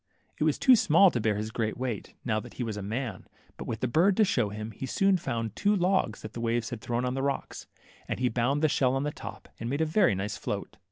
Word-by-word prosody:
It -, -, +2 dB
was -, -, +2 dB
too 260 Hz, -2 st, +6 dB
small 185 Hz, -2 st, +5 dB
to 120 Hz, -, -1 dB
bear 105 Hz, -1 st, +1 dB
his 110 Hz, +2 st, -3 dB
great 110 Hz, -1 st, -2 dB
weight, 120 Hz, -5 st, -4 dB
now 110 Hz, -3 st, +1 dB
that 120 Hz, +2 st, -11 dB
he 125 Hz, -, -3 dB
was 110 Hz, -3 st, -3 dB
a 105 Hz, -, -5 dB
man, 115 Hz, +5 st, -4 dB, 0.3 s
but -, -, -8 dB
with 110 Hz, -, -4 dB
the 130 Hz, -, +1 dB
bird 175 Hz, -, +3 dB
to 220 Hz, -, +6 dB
show 120 Hz, -, +1 dB
him, 105 Hz, +2 st, -6 dB
he 130 Hz, +6 st, -6 dB
soon 195 Hz, +7 st, +3 dB
found 115 Hz, -, -3 dB
ftwo 205 Hz, -, +1 dB
logs 180 Hz, -, +1 dB
that 110 Hz, -, -7 dB
the 115 Hz, -, -5 dB
waves 115 Hz, 0 st, -1 dB
had 120 Hz, -3 st, -5 dB
thrown 120 Hz, +3 st, -1 dB
on 125 Hz, -, -1 dB
the 135 Hz, -, -2 dB
rocks, 140 Hz, 0 st, -3 dB, 0.4 s
and -, -, -3 dB
he 125 Hz, -, +2 dB
bound 125 Hz, +5 st, 0 dB
the -, -, +6 dB
shell 130 Hz, -3 st, +2 dB
on 135 Hz, -, 0 dB
the 150 Hz, -, -1 dB
top, -, -, -9 dB
and 115 Hz, -, -3 dB
made 140 Hz, +3 st, -1 dB
a -, -, +3 dB
very 155 Hz, -, +3 dB
nice 95 Hz, +2 st, -3 dB
float. -, -, -5 dB
120 Hz, 270 wpm, -28 LUFS, 110-150 Hz, 0.4 s, too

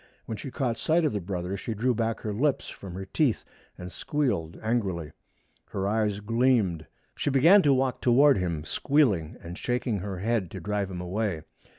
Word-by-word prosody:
When 110 Hz, -, -4 dB
she 135 Hz, -, -7 dB
caught 125 Hz, -3 st, -2 dB
sight 165 Hz, +1 st, +2 dB
of 150 Hz, -, +2 dB
the 105 Hz, -, -2 dB
brother 90 Hz, +1 st, -3 dB
she 110 Hz, +3 st, -4 dB
drew 125 Hz, +4 st, +1 dB
back 115 Hz, 0 st, -1 dB
her 105 Hz, -, -3 dB
lips 140 Hz, +6 st, 0 dB
from 95 Hz, -3 st, -9 dB
her 95 Hz, +1 st, -5 dB
teeth 125 Hz, +5 st, 0 dB, 0.3 s
and 90 Hz, 0 st, -8 dB
squealed 120 Hz, -, -1 dB
angrily. 95 Hz, -9 st, -1 dB, 0.5 s
Her 95 Hz, 0 st, -3 dB
eyes 105 Hz, -1 st, 0 dB
gleamed. 110 Hz, -7 st, +1 dB, 0.3 s
She -, -, -1 dB
began 160 Hz, +9 st, +6 dB
to 145 Hz, -, +3 dB
walk 130 Hz, -1 st, +1 dB
toward 135 Hz, 0 st, +5 dB
him, 85 Hz, -4 st, -2 dB
squealing 110 Hz, -, +1 dB
and 85 Hz, +2 st, -8 dB
shaking 120 Hz, -3 st, -1 dB
her 95 Hz, 0 st, -5 dB
head 105 Hz, -1 st, 0 dB
to -, -, -7 dB
drive 105 Hz, -2 st, -2 dB
him 90 Hz, -2 st, -5 dB
away. 90 Hz, -2 st, -2 dB
105 Hz, 185 wpm, -27 LUFS, 90-125 Hz, 0.5 s, began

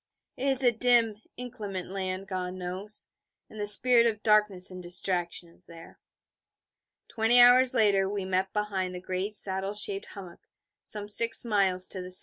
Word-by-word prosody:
It 265 Hz, -, -4 dB
is 270 Hz, -1 st, +1 dB
a 245 Hz, -, +4 dB
dim, 230 Hz, -2 st, +2 dB, 0.2 s
inclement 215 Hz, -7 st, -7 dB
land, 190 Hz, 0 st, -5 dB
God 185 Hz, -1 st, -5 dB
knows: 185 Hz, +3 st, -6 dB, 0.4 s
and 215 Hz, -, -11 dB
the 205 Hz, -, -3 dB
spirit 235 Hz, +2 st, +5 dB
of 215 Hz, -2 st, -4 dB
darkness 210 Hz, -4 st, +2 dB
and 185 Hz, 0 st, -9 dB
distraction 175 Hz, -1 st, -1 dB
is 170 Hz, +1 st, -10 dB
there. 165 Hz, -1 st, -15 dB, 1.1 s
Twenty 225 Hz, +2 st, +2 dB
hours 250 Hz, +1 st, +6 dB
later 195 Hz, -3 st, +2 dB
we 200 Hz, -2 st, -4 dB
met 190 Hz, 0 st, -2 dB
behind 195 Hz, -3 st, -3 dB
the -, -, -6 dB
great 185 Hz, +3 st, -5 dB
saddle 195 Hz, 0 st, -2 dB
shaped 200 Hz, -1 st, -2 dB
hummock, 185 Hz, -4 st, -11 dB, 0.4 s
some 205 Hz, -1 st, 0 dB
six 230 Hz, +3 st, +3 dB
miles 195 Hz, -4 st, +1 dB
to 185 Hz, -, -3 dB
the 180 Hz, -, -9 dB
S.E. 185 Hz, 0 st, +4 dB
200 Hz, 165 wpm, -27 LUFS, 185-220 Hz, 1.1 s, hours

